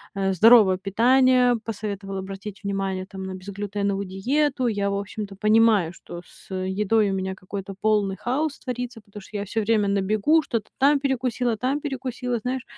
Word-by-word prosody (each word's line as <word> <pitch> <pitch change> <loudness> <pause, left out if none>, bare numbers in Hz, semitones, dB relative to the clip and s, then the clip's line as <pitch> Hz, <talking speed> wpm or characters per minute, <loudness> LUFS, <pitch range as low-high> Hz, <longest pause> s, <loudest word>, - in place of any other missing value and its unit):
а, 195 -1 0
здоровое 210 -1 +6
питание, 245 +5 +3
посоветовал 200 -3 -5
обратить 195 +2 -7
внимание, 195 -1 -2
там, 195 0 -9
на 190 0 -5
безглютеновую 200 +1 -3
диету. 260 +8 0
Я, 200 -3 0
в 200 - -1
общем-то, 200 0 -6
понимаю, 215 -4 +3
что 175 0 -10
с, - - -18
э, 185 0 -2
едой 210 +1 +2
у - - -1
меня 190 0 -3
какой-то 195 +1 -7
полный 205 -2 +1
хаос 270 - -2
творится, 245 -2 -5
потому 205 0 -12
что 205 +2 -8
я 200 - -3
всё 220 +3 -2
время 215 -1 +2
на 200 0 +1
бегу 215 +11 +3
что-то 230 -6 -4
там 280 +2 +4
перекусила, 250 -3 0
там 260 +5 -1
перекусила, 255 -3 -3
знаешь. 250 +2 -3
210 Hz, 175 wpm, -24 LUFS, 195-245 Hz, -, здоровое